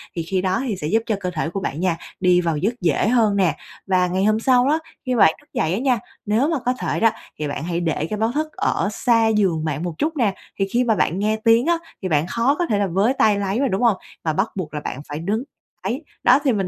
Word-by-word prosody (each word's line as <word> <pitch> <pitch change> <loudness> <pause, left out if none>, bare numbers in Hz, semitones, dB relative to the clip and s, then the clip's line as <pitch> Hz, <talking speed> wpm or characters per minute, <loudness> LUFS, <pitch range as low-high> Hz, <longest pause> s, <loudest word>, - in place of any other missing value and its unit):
Thì 170 - -2
khi 185 +3 -1
đó 185 +3 0
thì 215 - -1
sẽ 150 -5 -4
giúp 225 +7 +1
cho 220 - 0
cơ 180 -2 -3
thể 160 -1 -2
của 195 - -4
bạn 155 -5 -4
nha, 175 -2 0 0.2
đi 180 -1 +4
vào 165 -3 0
giấc 205 +10 0
dễ 165 +3 +2
hơn 225 -3 +3
nè. 185 -4 +2 0.3
Và 185 -1 +3
ngày 185 +2 0
hôm 215 +1 +3
sau 250 +1 +3
đó, 305 +3 +2 0.3
khi 255 -1 0
bạn 195 -8 +6
thức - - -27
dậy 160 +2 0
á 195 - 0
nha, 255 -2 +2 0.3
nếu 220 +7 +2
mà 325 -3 0
có 250 - +2
thể 255 - -2
đó 225 -1 +4 0.3
thì 150 - -2
bạn 145 0 -4
hãy 170 0 -2
để 160 -3 -1
cái 215 - -2
báo 225 +1 +1
thức 305 +4 -1
ở - - 0
xa 230 +1 +2
giường 190 -8 +1
bạn 155 0 -2
một 175 -2 -3
chút 315 +1 -1
nè, 220 -7 +2 0.3
thì 195 - +1
khi 245 +1 +2
mà 225 -3 +2
bạn 180 -2 0
nghe 215 +2 +1
tiếng 230 +2 +5
á 340 +1 +3 0.2
thì 190 - -2
bạn 155 -1 +1
khó 235 +8 +1
có 350 - +2
thể 215 - 0
là 200 - +1
với 195 +8 +2
tay 215 -6 +3
lấy 200 +3 -1
mà, 275 - +2
đúng 210 0 -1
không? 230 -5 +4 0.3
Mà 160 - 0
bắt 195 +8 0
buộc 170 -6 -5
là 150 - -2
bạn 140 -2 -5
phải 145 +1 -4
đứng 205 +8 -1 0.4
lấy. 260 +7 -2 0.2
Đó 255 +3 +6
thì 270 -4 +3
mình 195 -3 -1
200 Hz, 280 wpm, -21 LUFS, 175-235 Hz, 0.4 s, bạn